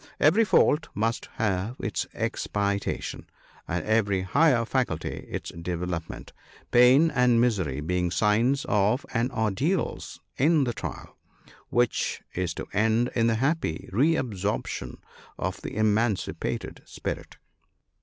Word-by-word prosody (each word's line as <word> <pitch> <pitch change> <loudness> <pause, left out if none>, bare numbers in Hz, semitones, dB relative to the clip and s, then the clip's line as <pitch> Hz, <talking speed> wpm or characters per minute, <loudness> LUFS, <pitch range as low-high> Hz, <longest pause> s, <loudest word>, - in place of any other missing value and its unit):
Every 180 +10 +5
fault 165 -6 +3
must 115 +3 -1
have 105 0 -1
its 100 -2 -2
expiation, 100 -1 -2 0.4
and 90 +1 -2
every 100 -3 +2
higher 125 - +3
faculty 130 +1 -2
its - - -5
development; 85 0 -5 0.4
pain 130 +7 +6
and 125 -4 +3
misery 95 - +1
being 90 +3 0
signs 115 - +2
of 105 +6 +2
and 120 +1 0
ordeals 125 - -1 0.2
in 155 +2 +4
the 120 -2 -1
trial, 105 - -7 0.5
which 120 -1 0
is 90 -2 -2
to - - -6
end 110 +4 +2
in 115 -1 +2
the 115 - +2
happy 135 - -1
re 145 - +3
absorption 105 - -3 0.4
of 95 +1 -3
the - - -6
eman 110 +1 +2
cipated - - -5
spirit. - - -6
110 Hz, 125 wpm, -26 LUFS, 95-130 Hz, 0.5 s, pain